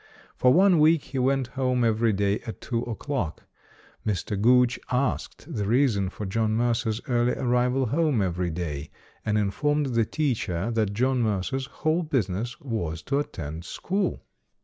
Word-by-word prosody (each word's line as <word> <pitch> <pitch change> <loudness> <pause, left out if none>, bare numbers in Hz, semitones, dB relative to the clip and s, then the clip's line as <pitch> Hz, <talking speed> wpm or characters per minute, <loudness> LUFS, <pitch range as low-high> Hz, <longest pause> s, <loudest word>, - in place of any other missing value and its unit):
For 125 - +4
one 185 +2 +5
week 155 0 +5
he 130 +1 -4
went 130 0 +1
home 125 -2 0
every 115 0 +2
day 100 0 +1
at 110 - -6
two 115 -2 -2
o'clock. 120 - -3 0.6
Mr. 105 0 -2
Gooch 125 +2 +4
asked 130 +2 -1
the 105 -5 -2
reason 115 -5 +2
for 105 - -6
John 110 +2 0
Mercer's 115 -1 0
early 120 -1 +2
arrival 125 +1 +1
home 145 +1 +1
every 90 -2 0
day, 80 -4 -4 0.3
and 110 -1 +1
in 105 -2 +1
formed 145 +3 0
the 115 -1 +3
teacher 115 - -1
that 110 -3 0
John 130 +3 +1
Mercer's 115 +5 -1
whole 155 +4 0
business 120 - -2
was 90 - -3
to 140 0 0
attend 80 - -5
school. 190 - -2
120 Hz, 155 wpm, -26 LUFS, 100-135 Hz, 0.6 s, one